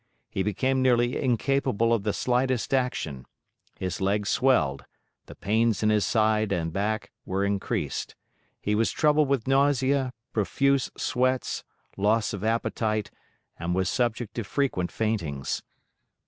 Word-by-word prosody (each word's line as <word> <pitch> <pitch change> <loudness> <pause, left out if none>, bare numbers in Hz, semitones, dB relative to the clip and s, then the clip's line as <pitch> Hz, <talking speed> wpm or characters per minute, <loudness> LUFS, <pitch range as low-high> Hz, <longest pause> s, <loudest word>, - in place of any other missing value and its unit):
He 95 - -1
became 130 +7 +1
nearly 120 -1 +3
incapable 125 -2 +1
of 115 - +1
the 105 +1 0
slightest 125 +2 0
action; 105 - -1 0.5
his 90 -1 -4
legs 100 +1 +1
swelled; 125 - +2 0.4
the - - -11
pains 110 +1 +1
in 105 - +4
his 105 -1 +3
side 110 -2 +2
and 80 -4 -1
back 105 +2 -2
were 95 +1 -1
increased; 100 -1 -2 0.4
he 105 - -1
was 110 +2 +2
troubled 150 -1 +3
with 135 -4 0
nausea, 135 -1 +2 0.2
profuse 140 +5 +1
sweats, 130 +1 0 0.3
loss 105 +3 +2
of 100 -1 -5
appetite, 110 -1 -1 0.5
and 85 +1 -1
was 95 0 +1
subject 120 -2 -1
to 115 - -3
frequent 100 -7 -1
faintings. 85 -12 -2
110 Hz, 135 wpm, -26 LUFS, 100-130 Hz, 0.5 s, in